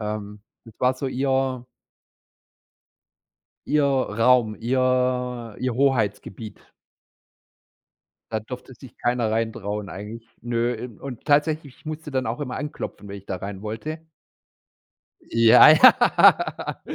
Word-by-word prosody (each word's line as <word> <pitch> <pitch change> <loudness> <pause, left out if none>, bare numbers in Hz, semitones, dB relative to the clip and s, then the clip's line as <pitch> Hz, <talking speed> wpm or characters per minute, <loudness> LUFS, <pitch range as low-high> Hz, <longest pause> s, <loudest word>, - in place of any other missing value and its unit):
Ähm, 105 -1 -6 0.2
das 115 -1 -15
war 125 +1 +2
so 135 +1 -5
ihr 130 -1 -1 2.0
ihr 150 0 +2
Raum, 125 -4 +2
ihr 125 -2 -1
ihr 125 -2 -2
Hoheitsgebiet. 110 -5 -1 1.7
Da 110 - -1
durfte 125 +3 -10
sich 125 0 -15
keiner 120 -2 0
rein 115 0 0
trauen 105 -2 -5
eigentlich, 105 +6 -9
ne. 120 0 -1
In 115 -1 -9
und 130 -4 -8
tatsächlich, 150 -2 +1
ich - - -26
musste 155 0 -6
dann 130 -3 -1
auch 115 +4 -4
immer 140 -4 -4
anklopfen, 145 -7 -7
wenn 100 0 -7
ich 100 - -15
da 95 - -4
rein 100 +1 -7
wollte. 130 +9 -5 1.3
Ja, 115 -1 +7
ja. - - +4
120 Hz, 120 wpm, -23 LUFS, 110-130 Hz, 2.0 s, Ja